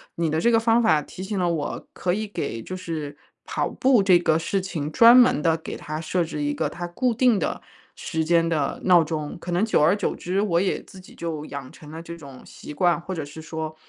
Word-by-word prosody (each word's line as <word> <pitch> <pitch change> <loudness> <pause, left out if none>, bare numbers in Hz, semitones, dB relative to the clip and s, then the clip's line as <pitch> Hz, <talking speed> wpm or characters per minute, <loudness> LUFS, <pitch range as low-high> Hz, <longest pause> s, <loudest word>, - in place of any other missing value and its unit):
你 165 -2 0
的 155 - 0
这 235 - +3
个 230 - +4
方 230 +1 +3
法 185 -10 +3
提 160 - -10
醒 200 0 -4
了 175 -1 +1
我 155 -4 -3
可 175 - -1
以 215 +3 -2
给 115 - -4
就 185 - -7
是， 160 -5 -6 0.3
跑 - - -1
步 255 -4 +3
这 185 -2 +6
个 160 -2 +2
事 190 +4 -1
情 160 -6 -4
专 235 +7 +8
门 245 -11 +5
地 165 0 +2
给 160 - -7
它 155 +1 -6
设 170 +2 -1
置 170 - -5
一 290 0 0
个 285 - -1
它 175 0 -6
固 245 +8 0
定 240 -2 +3
的 - - -3 0.3
时 160 0 -3
间 165 0 +3
的 150 -4 -1
闹 175 -3 +6
钟， 150 -1 -4
可 175 - -6
能 180 +5 +2
久 220 - +2
而 165 +6 +4
久 205 - -1
之 185 +3 -2
我 175 -4 +1
也 195 - -1
自 190 - -14
己 185 - -15
就 160 -3 -5
养 140 -3 -8
成 150 - -14
了 160 - -7
这 170 0 -8
种 140 -5 -12
习 150 - -10
惯， 175 +2 +2
或 185 +2 -6
者 160 -4 -4
是 150 +2 -10
说， 160 -1 -6
170 Hz, 265 characters per minute, -24 LUFS, 155-195 Hz, 0.3 s, 专